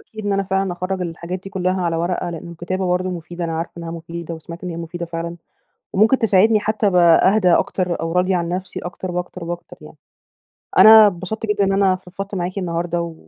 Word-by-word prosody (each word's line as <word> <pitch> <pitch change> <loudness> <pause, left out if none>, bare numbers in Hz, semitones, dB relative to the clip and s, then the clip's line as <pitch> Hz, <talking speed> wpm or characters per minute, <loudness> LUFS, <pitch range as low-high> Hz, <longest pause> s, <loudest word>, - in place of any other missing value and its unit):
أكيد 215 -1 -10
إن 205 - +1
أنا 195 0 +1
فعلًا 190 -1 -1
أخرّج 185 +2 -3
الحاجات 175 +1 -5
دي 195 - -9
كلها 185 -1 -1
على 170 -1 0
ورقة؛ 175 +2 -1
لأن 170 0 -7
الكتابة 185 +3 -3
برضه 180 +1 0
مفيدة، 175 0 -6
أنا 165 -1 -3
عارفة 165 - -4
إنها 170 -1 -6
مفيدة 170 0 -6
وسمعت 170 +2 -10
إن 180 - -4
هي 165 - -6
مفيدة 170 +1 -5
فعلًا، 170 0 -5 0.6
وممكن 220 +6 +4
تساعدني 215 -1 +4
حتى 215 0 0
أبقى 180 +1 +5
أهدى 185 -5 +4
أكتر 180 -1 0
أو 165 0 -2
راضية 180 +2 +2
عن 170 -1 -1
نفسي 180 +1 -4
أكتر 180 +1 -6
وأكتر 180 0 -5
وأكتر 175 +1 -7
يعني. - - -13 0.8
أنا 220 0 +10
أتبسطت 200 +3 -3
جدًا 210 -1 +1
إن 195 - +1
أنا 195 -1 +3
فضفضت 195 +2 -8
معاكِ 185 +1 -3
النهاردة، 170 -1 -2
و 170 -1 -6
180 Hz, 210 wpm, -20 LUFS, 170-195 Hz, 0.8 s, أنا